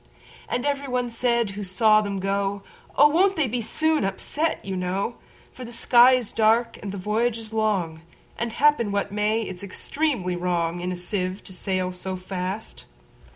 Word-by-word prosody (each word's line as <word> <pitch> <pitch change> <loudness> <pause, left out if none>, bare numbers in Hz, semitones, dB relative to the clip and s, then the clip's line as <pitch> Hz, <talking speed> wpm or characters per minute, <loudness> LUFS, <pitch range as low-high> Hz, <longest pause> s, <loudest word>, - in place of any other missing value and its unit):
And 245 - -1
every 280 -1 -1
one 250 -1 -1
said 235 -2 +1
who 205 +1 -6
saw 215 +3 +4
them 200 -2 -3
go,"Oh! 200 +8 +1
won't 380 +6 +3
they 310 -4 +1
be 240 +1 -2
soon 315 +6 +1
upset, 290 +11 -1
you 195 -1 -3
know:For 195 +7 -5
the 235 - -8
sky 245 +1 +6
is 250 -4 -1
dark, 230 +2 +2
and 200 - -5
the 200 - -6
voyage 220 +4 0
is 225 -1 -10
long; 195 -8 0 0.3
And, 235 0 -3
happen 290 -8 +3
what 200 0 -1
may, 210 +2 +1
it 185 -4 -7
's - - -8
extremely 200 - -2
wrongIn 175 0 -1
a - - -3
sieve 185 +1 -3
to 190 - -8
sail 185 0 -2
so 190 +1 -5
fast." 185 +3 -5
210 Hz, 170 wpm, -24 LUFS, 185-240 Hz, 0.3 s, sky